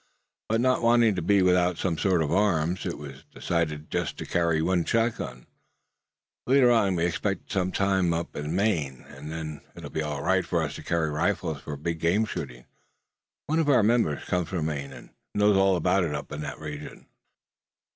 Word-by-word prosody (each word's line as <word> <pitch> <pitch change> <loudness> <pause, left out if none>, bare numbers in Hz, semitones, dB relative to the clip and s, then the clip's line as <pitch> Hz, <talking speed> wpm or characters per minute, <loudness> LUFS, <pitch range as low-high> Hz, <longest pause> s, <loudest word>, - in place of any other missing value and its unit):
But 115 +1 +2
not 130 +1 +2
wanting 115 -2 +4
to 95 - -2
be 100 +3 +3
without 90 -1 +3
some 90 -3 -1
sort 90 -5 +2
of 75 - -3
arms, 90 -2 +1
it 85 - -4
was 70 -2 -10
decided 80 -3 -2
to - - -2
carry 85 -2 +1
just 80 - 0
one 90 -1 +2
shotgun. 115 - -1 1.0
Later 130 -1 +5
on 100 -5 +3
we 85 0 +1
expect 95 +3 -2
to - - -14
spend 100 - +1
some 90 +1 -2
time 95 -3 +1
up 85 +1 -3
in 75 +3 -3
Maine; 80 - 0
and 75 +3 -9
then 80 -2 -6
it'll - - -9
be 80 - -2
all 75 -2 -3
right 95 +1 +2
for 85 -1 0
us 70 - -3
to - - -9
carry 80 -2 0
rifles 80 -2 -1
for 75 -2 -6
big 80 +2 -3
game 90 +7 +2
shooting. 65 - -6 0.8
One 160 +2 0
of 155 -3 +1
our 125 -6 +5
members 110 - +2
comes 90 -2 -1
from 85 -5 -2
Maine, 70 -3 -3
and - - -12 0.2
knows 105 0 +4
all 95 0 +4
about 90 +2 +2
it 75 -3 -2
up 70 - -6
in 75 - -5
that - - -6
region." 75 -1 -8
85 Hz, 200 wpm, -26 LUFS, 75-100 Hz, 1.0 s, Later